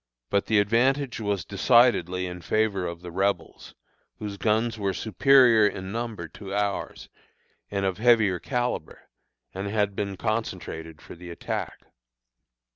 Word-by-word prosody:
But 100 - +1
the 110 - +3
advantage 120 +6 +2
was 100 -4 -2
decidedly 100 -5 +3
in 90 -1 -7
favor 100 -2 0
of 85 0 -7
the 90 - -7
Rebels, 95 +3 -2 0.4
whose 105 -2 -5
guns 110 +2 0
were 100 -2 -1
superior 115 0 +5
in 95 -1 -5
number 110 -6 -4
to 100 +2 -8
ours, 100 -1 -2 0.6
and 100 -1 -2
of 95 0 -1
heavier 110 -6 +4
calibre, 125 - -3 0.6
and 95 +2 -4
had 100 -1 0
been 100 -1 -3
concentrated 80 -8 -4
for - - -10
the 90 0 -11
attack. 85 - -5
100 Hz, 135 wpm, -26 LUFS, 95-115 Hz, 0.6 s, superior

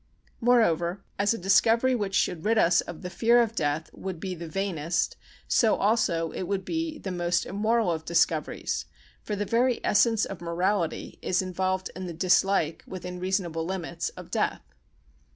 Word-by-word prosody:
Moreover, 195 -7 +2 0.2
as 200 0 +3
a 230 - 0
discovery 225 +7 +3
which 205 -5 -1
should 165 -2 +1
rid 225 +2 +2
us 175 -4 +4
of 165 - -9
the 180 - -4
fear 235 +4 +4
of 230 -2 +2
death 155 -4 -1
would 190 -3 -6
be 185 +2 -4
the 170 -1 -7
vainest, 175 -2 -1 0.3
so 225 -3 +3
also 180 -6 +1
it 185 - -4
would 195 -1 -2
be 325 -1 -2
the 190 - -5
most 175 0 0
immoral 215 0 +1
of 160 -1 -3
discoveries, 165 -2 0 0.3
for 210 - -3
the 205 +1 -2
very 240 +3 +2
essence 225 +1 +3
of 195 -3 -8
morality 170 0 -1
is 185 +1 +1
involved 185 0 -2
in 185 0 -5
the 170 - -5
dislike 180 -1 +2
(within 180 -1 -6
reasonable 180 -3 -1
limits) 175 -2 -3
of - - -10
death. - - -1
185 Hz, 170 wpm, -27 LUFS, 170-215 Hz, 0.3 s, us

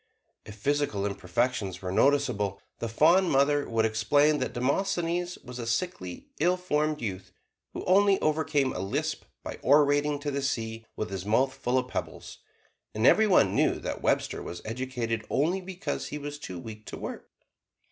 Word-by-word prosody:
If 105 - -9
physical 135 -3 0
imperfections 100 0 -1
were 90 - -3
noticeable, 120 -6 +2 0.2
the 115 - -3
fond 170 +10 +4
mother 140 +1 +2
would 115 -1 +2
explain 145 +8 +3
that - - -2
Demosthenes 175 +6 0
was 125 -1 -8
a 115 - -4
sickly, 115 - -3
ill 175 +4 +3
formed 155 -5 -1
youth, 95 -3 -5 0.4
who - - -5
only 195 +1 +4
overcame 155 -3 +1
a - - -4
lisp 95 +1 -2 0.2
by - - -6
orating 145 +1 +4
to 145 0 -2
the 140 0 -2
sea 115 -4 -3
with 110 - -4
his 95 -2 -4
mouth 130 +6 +2
full 125 0 -1
of 130 -1 0
pebbles; - - -6 0.6
and 110 +2 +1
every 220 +9 +6
one 195 - +4
knew - - +3
that - - -5
Webster - - 0
was 85 - -7
educated 115 -1 -3
only 170 +8 +1
because 180 -5 -4
he 150 - -5
was 145 0 -6
too 95 -11 -7
weak 110 +4 -9
to - - -6
work. - - -7
135 Hz, 165 wpm, -28 LUFS, 110-150 Hz, 0.6 s, every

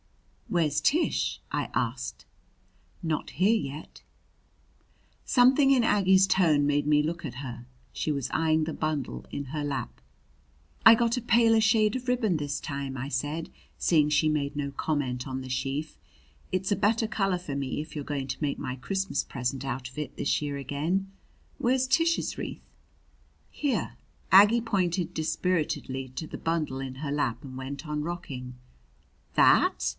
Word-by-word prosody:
"Where's 150 -4 +1
Tish?" 310 - +1
I - - -1
asked. - - -3 0.8
"Not 160 -3 -2
here 195 +7 +3
yet." 150 -5 -5 1.2
Something 265 +2 +5
in 255 -3 +4
Aggie's 190 -3 +4
tone 155 -7 +3
made 145 0 +1
me 150 0 +4
look 165 +3 -3
at 125 - -5
her. 125 -2 -7 0.3
She 155 - -1
was 140 -4 -2
eyeing 160 0 +2
the 160 - -4
bundle 140 - -3
in 140 - -4
her 150 - -2
lap. 135 - -4 0.8
"I 225 - +11
got 235 0 +1
a 250 - -2
paler 225 -1 +4
shade 215 0 +3
of 255 0 -4
ribbon 235 -7 +2
this 145 -2 -2
time," 140 -2 -5
I 130 +2 -4
said, 145 +4 -3 0.3
seeing 150 -3 +3
she 150 +1 +3
made 145 -2 -1
no 140 -1 -2
comment 135 -4 -2
on 130 -1 -4
the 130 - -8
sheaf. 135 +4 -3 0.5
"It's 185 +2 -1
a - - +4
better 215 +3 +2
color 195 -4 0
for 175 -6 -6
me 140 0 -2
if 155 +2 -7
you're 145 - -3
going 140 -2 -3
to 130 - -5
make 145 -2 -1
my 130 -3 -4
Christmas 190 +5 -2
present 130 0 -3
out 130 -1 -4
of 130 - -15
it 150 - -5
this - - 0
year 145 -1 -3
again. 155 +8 -2 0.5
Where's 260 +2 +2
Tish's 330 +5 +1
wreath?" - - -6 0.8
"Here." 260 - -1 0.4
Aggie 210 +5 +8
pointed 180 -5 0
dispiritedly 155 -5 -1
to 155 +4 -4
the - - -8
bundle 160 -5 -1
in 130 -1 -6
her 140 +1 -4
lap 135 -3 -1
and 130 -1 -9
went 135 +3 -6
on 150 0 -2
rocking. 140 -7 -6 0.8
"That! - - +4
150 Hz, 160 wpm, -28 LUFS, 140-195 Hz, 1.2 s, I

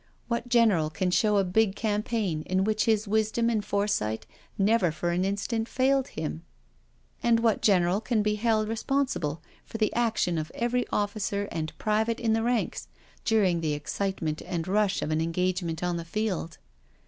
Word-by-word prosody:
What 235 0 -2
general 220 -10 +4
can 180 +4 -1
show 210 +2 +3
a 200 - +4
big 195 +2 +2
campaign 210 -5 -1
in 185 +1 +1
which 215 +1 +1
his 220 -2 +2
wisdom 220 +2 +1
and 215 -3 0
foresight 200 - -1 0.3
never 200 -3 +3
for 175 +3 -2
an 175 +2 +1
instant 200 +4 -1
failed 265 +1 +2
him? 75 +2 -5 0.8
And 235 -1 +3
what 225 -2 +2
general 185 -1 +3
can 220 -1 0
be 210 0 +1
held 215 0 +1
responsible 225 - -1 0.2
for - - -7
the 215 -1 +1
action 225 -8 +1
of 155 0 -5
every 240 +1 0
officer 205 -1 -1
and 155 -1 -4
private 220 +2 0
in 230 -2 +1
the 225 - +1
ranks, 240 0 -1 0.4
during 195 -7 +2
the 155 -2 0
excite 190 +6 -3
ment 155 -1 -2
and 175 -2 -4
rush 205 +1 +1
of 155 - -2
an 155 0 +1
engagement 175 0 -1
on 175 -1 0
the 170 - -4
field? 180 -3 -3
205 Hz, 170 wpm, -27 LUFS, 175-225 Hz, 0.8 s, general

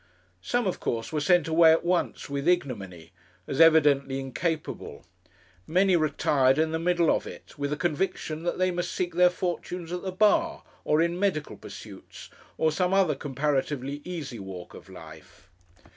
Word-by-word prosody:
Some, 245 - -1
of 185 - -2
course, 115 +6 -3
were 150 - 0
sent 175 +1 +3
away 160 0 +6
at 165 +1 +2
once 175 0 -1
with 140 +2 -3
ignominy, 100 - -1 0.3
as 135 - 0
evidently 145 -4 +4
incapable. 150 +4 -4 0.6
Many 185 +2 +3
retired 140 -4 +2
in 160 0 +1
the 160 - -1
middle 175 -1 +2
of - - -4
it - - -11
with 145 0 -2
a 150 - -1
conviction 165 -1 -2
that 175 +1 -2
they 185 0 +1
must 175 0 -3
seek 175 -2 -2
their 180 +1 +5
fortunes 175 -1 -4
at 180 0 -3
the 190 - -4
bar, 215 - +2 0.2
or 155 +2 +2
in 170 +1 -2
medical 185 -7 -1
pursuits, - - -12 0.3
or 160 - +2
some 180 +4 0
other 190 -6 +3
comparatively 140 0 -2
easy 150 -10 -6
walk 95 -2 -9
of - - -13
life. - - -14
160 Hz, 165 wpm, -27 LUFS, 140-180 Hz, 0.6 s, away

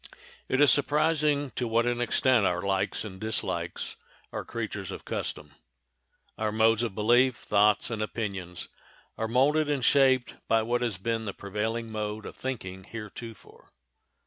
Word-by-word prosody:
It 130 - +1
is 145 - +8
surprising 150 -1 +2
to 120 +2 -2
what 115 +1 +2
an 120 0 0
extent 120 -1 +3
our 90 -1 +1
likes 100 +2 0
and 95 -3 -9
dislikes 110 0 -3 0.4
are - - -3
creatures - - -5
of - - -7
custom. 75 -1 -4 0.9
Our 110 -1 0
modes 110 +1 +3
of 115 -5 -2
belief, 120 +4 +4
thoughts, 105 +2 +2
and 110 -2 -2
opinions 100 -6 -4 0.5
are 110 - -2
molded 145 +6 +3
and 140 -5 0
shaped 130 -3 +4
by 115 0 +3
what 120 +2 0
has 115 -6 -1
been 115 +3 -2
the 100 - -4
prevailing 110 +3 -3
mode 105 0 -4
of - - -8
thinking 95 -8 -5
heretofore. 110 0 -10
115 Hz, 150 wpm, -28 LUFS, 105-125 Hz, 0.9 s, is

